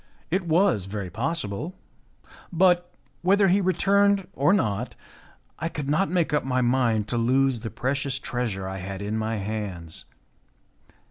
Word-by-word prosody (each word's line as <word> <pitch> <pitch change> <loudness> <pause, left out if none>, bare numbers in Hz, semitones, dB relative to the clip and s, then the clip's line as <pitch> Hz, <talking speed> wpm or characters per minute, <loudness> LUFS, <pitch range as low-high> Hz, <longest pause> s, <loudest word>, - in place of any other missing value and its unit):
It 185 0 0
was 165 - +3
very 95 -2 -5
possible. 145 - -3 0.8
But, 175 0 +3 0.3
whether 195 +2 +4
he 195 +3 +4
returned 200 +1 +3
or 145 +3 +3
not, 115 - 0 0.6
I 165 - -2
could 150 -4 -5
not 155 +7 +2
make 170 -4 +1
up 150 - +2
my 130 -1 0
mind 120 -4 +2
to 120 - 0
lose 130 +1 +2
the 115 0 -5
precious 135 +2 -1
treasure 115 -7 -3
I 95 0 -4
had 95 +2 -6
in 105 +2 -2
my 110 +1 -1
hands. 100 -6 -5
130 Hz, 145 wpm, -25 LUFS, 110-175 Hz, 0.8 s, whether